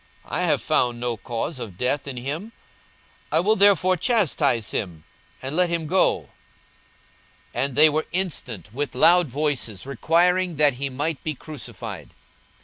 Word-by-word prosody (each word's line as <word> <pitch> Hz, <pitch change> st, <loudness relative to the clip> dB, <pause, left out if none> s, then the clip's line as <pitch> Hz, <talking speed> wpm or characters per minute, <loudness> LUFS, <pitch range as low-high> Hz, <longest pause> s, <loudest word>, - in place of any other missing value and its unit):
I -, -, -1 dB
have -, -, +1 dB
found 120 Hz, -1 st, +1 dB
no 120 Hz, -1 st, -2 dB
cause 120 Hz, +6 st, -4 dB
of 100 Hz, -7 st, -8 dB
death 135 Hz, +5 st, -1 dB
in 130 Hz, -3 st, -5 dB
him: 155 Hz, -, -5 dB, 0.8 s
I -, -, +3 dB
will 210 Hz, +5 st, +3 dB
therefore 190 Hz, -2 st, +5 dB
chastise 155 Hz, -, +1 dB
him, 85 Hz, -6 st, -4 dB, 0.4 s
and 135 Hz, +3 st, -4 dB
let 180 Hz, 0 st, +3 dB
him 170 Hz, -2 st, -1 dB
go. 185 Hz, +5 st, +1 dB, 1.2 s
42:023:023 -, -, 0 dB
And 140 Hz, -3 st, -4 dB
they 150 Hz, +2 st, +8 dB
were 155 Hz, +1 st, -1 dB
instant 125 Hz, -, -3 dB
with 140 Hz, 0 st, -3 dB
loud 175 Hz, +6 st, +5 dB
voices, 130 Hz, -7 st, -2 dB
requiring 175 Hz, +6 st, +1 dB
that 145 Hz, -1 st, +4 dB
he 140 Hz, -, 0 dB
might 145 Hz, +3 st, -3 dB
be 155 Hz, -1 st, -3 dB
crucified. 150 Hz, -1 st, -8 dB
145 Hz, 150 wpm, -23 LUFS, 125-175 Hz, 1.2 s, they